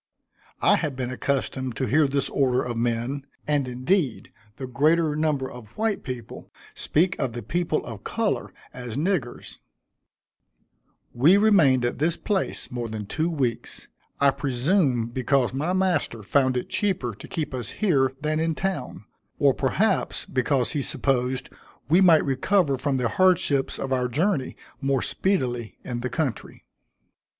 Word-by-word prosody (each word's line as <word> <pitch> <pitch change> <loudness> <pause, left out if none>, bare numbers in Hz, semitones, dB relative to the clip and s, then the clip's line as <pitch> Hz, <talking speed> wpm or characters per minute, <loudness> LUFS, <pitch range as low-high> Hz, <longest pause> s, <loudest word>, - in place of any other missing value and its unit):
I - - +5
had 145 -3 -2
been 130 -1 -3
accustomed 130 -1 -2
to 130 - -1
hear 150 +3 +3
this 140 0 -1
order 130 -2 +1
of 120 -1 -4
men, 120 +4 -2 0.2
and 145 -3 +1
indeed 130 - -1 0.2
the 135 - -6
greater 150 +4 +2
number 150 -4 0
of 125 -3 -10
white 220 -2 0
people 125 -4 -7 0.2
speak 180 +4 +1
of 120 - -1
the 120 -1 -6
people 170 +5 -1
of 110 -4 -8
color - - -1 0.2
as 125 -2 -6
niggers. 150 - -2 1.5
We 155 +11 +5
remained 165 - +4
at 120 - -2
this 160 +3 +1
place 200 -3 -2
more 120 -2 -4
than 110 -1 -5
two 160 +11 -1
weeks; 130 -8 -3 0.3
I 140 0 +5
presume 135 - +1
because 125 +1 0
my 150 +6 -1
master 180 - 0
found 130 +4 +2
it 125 - -3
cheaper 175 - -1
to 100 - -11
keep 150 -3 -4
us 125 -4 -4
here 140 - +2
than 155 +1 0
in 165 0 0
town, 190 +2 -4 0.3
or - - +4
perhaps, - - 0
because 130 0 0
he 145 - -1
supposed 130 -1 -1 0.4
we 175 +5 +5
might 170 -4 +6
recover 140 +3 +2
from 135 +1 -1
the 125 -2 +1
hardships 165 -1 +2
of 135 0 -2
our 125 -1 +1
journey 150 - 0 0.2
more 135 -2 +1
speedily 125 - -1
in 120 -2 -4
the 125 +1 -3
country. 130 -3 -4
135 Hz, 150 wpm, -25 LUFS, 125-160 Hz, 1.5 s, might